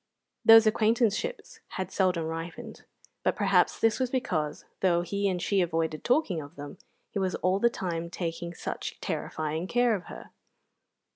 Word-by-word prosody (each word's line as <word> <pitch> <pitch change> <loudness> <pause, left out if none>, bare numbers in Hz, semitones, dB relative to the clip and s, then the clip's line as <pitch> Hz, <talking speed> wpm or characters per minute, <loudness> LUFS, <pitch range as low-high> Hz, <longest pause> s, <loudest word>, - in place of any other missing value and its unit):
Those 225 0 +9
acquaintanceships 225 - +1 0.2
had 190 0 -3
seldom 180 -4 +1
ripened; 165 +1 -7 0.4
but - - +1
perhaps - - +2
this 225 0 +2
was 255 -1 0
because, 180 - -2
though 175 -2 +2
he 200 +3 -1
and 180 -2 -1
she 195 +2 +1
avoided 165 -2 -1
talking 245 - +1
of 145 -1 -12
them, 145 +4 -9 0.3
he 200 - -2
was 190 -2 0
all 185 +2 +1
the 235 - +4
time 170 -6 -4
taking 170 -1 -4
such - - -5
terrifying 155 +3 -3
care 245 +2 +3
of 200 -2 -3
her. - - -11
185 Hz, 155 wpm, -28 LUFS, 165-220 Hz, 0.4 s, Those